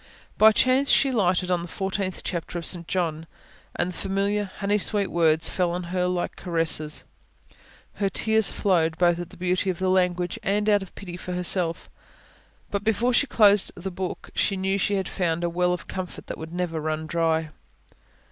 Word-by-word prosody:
By 220 +1 +7
chance 260 +5 +3
she 275 - +4
lighted 185 -5 +1
on 175 -1 +1
the 170 - -6
Fourteenth 190 +1 -3
Chapter 175 0 -4
of 170 - -5
St 170 -3 -1
John, 165 -3 -2 0.5
and 180 - 0
the - - -10
familiar, 200 +2 0
honey 200 +2 -1
sweet 205 0 +1
words 160 -2 +3
fell 180 -2 0
on 175 +1 -3
her 180 +2 -3
heart 180 0 +1
like 180 -1 -2
caresses. 165 -3 0 0.9
Her 200 -1 -1
tears 220 +2 +2
flowed; 165 -5 +1
both 175 -1 +3
at 175 -1 -6
the - - -15
beauty 185 +2 0
of 180 - -1
the 185 +1 0
language 180 -1 0
and 205 +1 0
out 205 -1 +4
of 195 - -10
pity 180 -3 -8
for 180 +1 -6
herself; 180 -1 0 0.8
and 200 0 -2
before 225 +3 +1
she 285 - +3
closed 205 -4 +4
the 190 +2 -6
Book, 185 0 -5
she 195 - 0
knew 190 +1 0
that - - 0
she 205 - +1
had 190 -1 -1
found 170 -2 -1
a 170 - +1
well 180 +1 +1
of 180 - -4
comfort 185 -2 -6
that - - -6
would 160 0 -7
never 175 -2 -2
run 155 0 -3
dry. 160 -1 0
180 Hz, 195 wpm, -25 LUFS, 170-200 Hz, 0.9 s, By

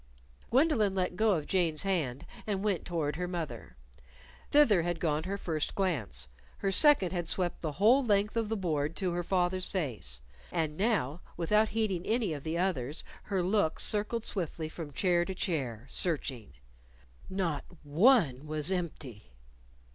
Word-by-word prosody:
Gwendolyn 250 -8 +3
let 180 -1 -1
go 215 +2 +3
of 155 -3 -3
Jane's 170 -3 +1
hand 160 -10 -1 0.2
and 200 -2 -1
went 200 -5 0
toward 155 -4 -2
her 180 0 -2
mother. 150 - -6 0.7
Thither 240 -11 +5
had 175 0 -2
gone 155 -1 0
her 200 +2 -2
first 160 -6 -2
glance; 125 - -1 0.3
her 195 - -1
second 280 - +5
had 175 -3 -2
swept 175 0 0
the 155 -3 -3
whole 230 - +4
length 210 -2 +1
of 225 -2 0
the 225 - -1
board 155 -4 -1
to 185 -2 -1
her 175 +1 -1
father's 180 +1 0
face. 110 - -2 0.3
And 155 -2 -1
now, 185 - 0 0.2
without 210 +6 +2
heeding 205 -6 -1
any 220 -6 +1
of 145 - -6
the 160 +3 -3
others, 160 -6 -1 0.2
her 190 -3 0
look 185 -3 +1
circled 215 +2 0
swiftly 165 -4 -3
from 160 -2 -7
chair 175 +3 +2
to 185 +2 -5
chair 130 - -2
searching. 135 - 0 0.8
Not 180 -6 -1 0.2
one 155 - +3
was 155 +3 +2
empty! 140 - -5
175 Hz, 155 wpm, -30 LUFS, 150-200 Hz, 0.8 s, Thither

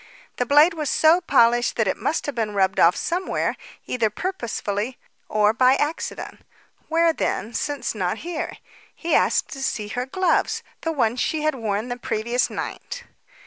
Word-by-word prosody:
The 245 - 0
blade 295 +6 +6
was 305 -4 -2
so 320 +3 +5
polished 240 -6 +3
that 225 - +1
it - - +1
must 315 - -1
have 290 - -3
been 220 -4 -2
rubbed 190 -1 +2
off 170 +2 +6
somewhere, 360 +2 -1 0.3
either 235 -3 0
purposely 230 - -3 0.3
or 210 0 +3
by 255 +2 +5
accident. 295 +3 -3 0.5
Where 330 0 +3
then, 230 -6 -2
since 285 -3 -2
not 185 -1 -1
here? 340 -2 -4 0.4
He 340 - -2
asked - - +3
to 270 - -7
see 210 -5 -2
her 245 +4 -3
gloves 370 +7 +1 0.2
the 325 - -1
ones 250 -5 0
she 310 +3 0
had 310 0 +2
worn 220 -2 -2
the 245 - -3
previous 235 +1 -1
night. - - -6
250 Hz, 165 wpm, -23 LUFS, 220-310 Hz, 0.5 s, blade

